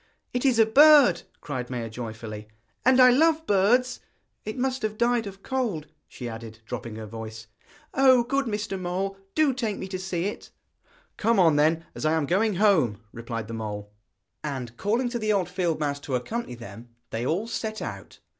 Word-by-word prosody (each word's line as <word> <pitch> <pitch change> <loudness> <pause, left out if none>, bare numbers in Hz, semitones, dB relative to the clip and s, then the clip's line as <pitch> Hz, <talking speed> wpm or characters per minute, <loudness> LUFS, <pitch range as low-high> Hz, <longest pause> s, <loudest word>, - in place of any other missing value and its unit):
'It 245 - -1
is 260 -4 +3
a 225 - +6
bird,' 275 - +7 0.2
cried 130 -4 -5
Maia 120 -3 -3
joyfully, 110 -2 -7 0.4
'and 260 +1 +5
I 255 -1 +8
love 320 +4 +3
birds! 235 +5 +2 0.5
It 215 - -5
must 260 0 -1
have 215 0 -2
died 235 -1 +1
of 195 0 -10
cold,' 235 - -2 0.2
she 125 - -8
added, 115 -1 -8
dropping 115 -1 -6
her 110 0 -7
voice. 110 0 -8 0.5
'Oh! 260 -2 +5
good 275 +3 0
Mr. 210 -2 -3
Mole, 185 +2 -2 0.2
do 310 -4 +3
take 225 -5 -2
me 190 - -5
to 185 -1 -4
see 185 -2 -2
it!' 205 - -5 0.7
'Come 195 -8 +4
then, 160 +3 +2
as - - -7
I 155 +1 +2
am 160 -2 +1
going 200 +6 +1
home,' 175 - +3
replied 115 -2 -5
the 115 - -7
mole. 105 -2 -5 0.5
And 130 -6 -5
calling 230 - 0
to 240 0 -3
the 215 -1 0
old 190 -4 +1
field 180 -3 -1
mouse 145 -2 -1
to 140 -2 -3
accompany 170 - -3
them, 115 0 -11 0.2
they 115 +1 -2
all 170 - 0
set 220 -1 -4
out. 100 -6 -7
185 Hz, 185 wpm, -26 LUFS, -, 0.7 s, I